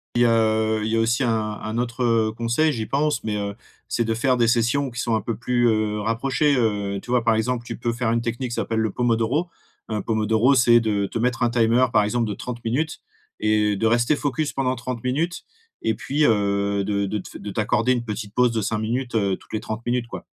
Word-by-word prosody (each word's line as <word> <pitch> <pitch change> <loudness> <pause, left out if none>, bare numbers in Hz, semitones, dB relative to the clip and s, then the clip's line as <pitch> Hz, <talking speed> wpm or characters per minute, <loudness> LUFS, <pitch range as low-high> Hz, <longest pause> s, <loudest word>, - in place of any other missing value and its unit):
Et 120 0 +4
heu, 110 -1 +2
il 110 - -1
y - - +1
a - - +2
aussi 115 +3 +1
un 120 -2 +2 0.3
un 110 +2 -4
autre, 120 +1 -2
heu, 115 -2 +2
conseil, 120 +7 +1
j'y 115 -6 -3
pense 145 +2 0
mais, 110 -1 -2
heu, 100 -1 -3 0.3
c'est 115 - 0
de 115 - 0
faire 125 +3 +1
des 120 -1 +3
sessions 120 +4 +1
qui 120 - -7
sont 115 -2 0
un 110 - 0
peu 115 +3 -3
plus, 120 +1 +1
heu, 110 -1 +1
rapprochées, 135 +7 +1
heu, 105 -5 0
tu - - -14
vois 125 -1 +2
par 115 -1 +3
exemple, 120 +2 -1
tu - - -6
peux 120 0 -1
faire 115 -1 -1
une 115 0 +1
technique 120 +2 -3
qui - - -3
s'appelle 115 - -2
le 110 -2 0
pomodoro. 120 - 0 0.4
Heu, 105 -2 -2
pomodoro, 110 +3 +2
c'est 120 -2 +5
de 105 -3 0
te - - -4
mettre 120 +1 0
un 120 - +3
timer, 115 +1 +3
par 105 -3 +4
exemple 115 +1 0
de 105 - -3
30 120 +1 -7
minutes 150 +8 -1 0.4
et 105 -1 +2
de 110 +3 +1
rester 120 +5 +3
focus 145 0 -2
pendant 130 -2 0
30 120 -1 -5
minutes 155 +8 -1 0.4
et 110 - 0
puis, 150 +3 0
heu, 100 -2 +1
de 100 0 0
de 105 +2 -2
te 100 - -8
f - - -10
de 105 - -7
t'accorder 110 +4 +1
une 120 -2 0
petite 105 -1 -6
pause 125 -1 +4
de 115 -1 -1
5 105 +1 -1
minutes, 120 +3 -2
heu, 100 -3 +1
toutes - - -19
les 110 - 0
30 110 +2 -5
minutes, 120 0 0
quoi. - - -8
115 Hz, 240 wpm, -23 LUFS, 110-125 Hz, 0.4 s, c'est